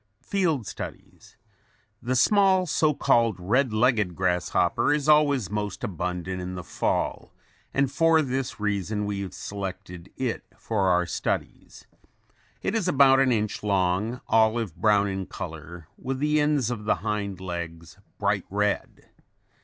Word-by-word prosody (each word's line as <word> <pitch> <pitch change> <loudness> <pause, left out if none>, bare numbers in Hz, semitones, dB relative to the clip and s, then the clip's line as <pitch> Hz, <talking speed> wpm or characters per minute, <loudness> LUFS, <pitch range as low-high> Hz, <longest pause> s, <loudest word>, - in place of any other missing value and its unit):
FIELD 165 - 0
STUDIES - - -9 0.6
The 125 +2 -1
small 190 - +4
so 155 -1 +2
called 115 -6 +2
red 120 +8 +1
legged 110 -5 +2
grasshopper 90 - +1
is 150 0 0
always 145 - +4
most 105 0 -3
abundant 90 -2 -3
in 90 +1 -5
the 90 - -6
fall - - -2 0.4
and 135 -1 +1
for 165 -1 +4
this 130 -3 -3
reason 105 0 -1
we 100 -1 -3
have 95 - -6
selected 95 -2 -7
it 130 -3 -2
for 100 -4 0
our 90 0 +3
studies. 85 - -4 0.8
It - - -1
is 220 -5 0
about 135 -4 +5
an 135 -1 +3
inch 105 -2 -1
long, 100 +4 0
olive 110 -4 +2
brown 105 -2 +3
in 95 -2 -4
color 85 -1 -8
with 135 +1 -3
the 150 +2 +1
ends 145 -5 +1
of 110 -3 -5
the - - +3
hind 100 -3 -2
legs 85 -1 -7 0.2
bright 100 -2 0
red. 105 +1 -2
105 Hz, 140 wpm, -26 LUFS, 95-135 Hz, 0.8 s, about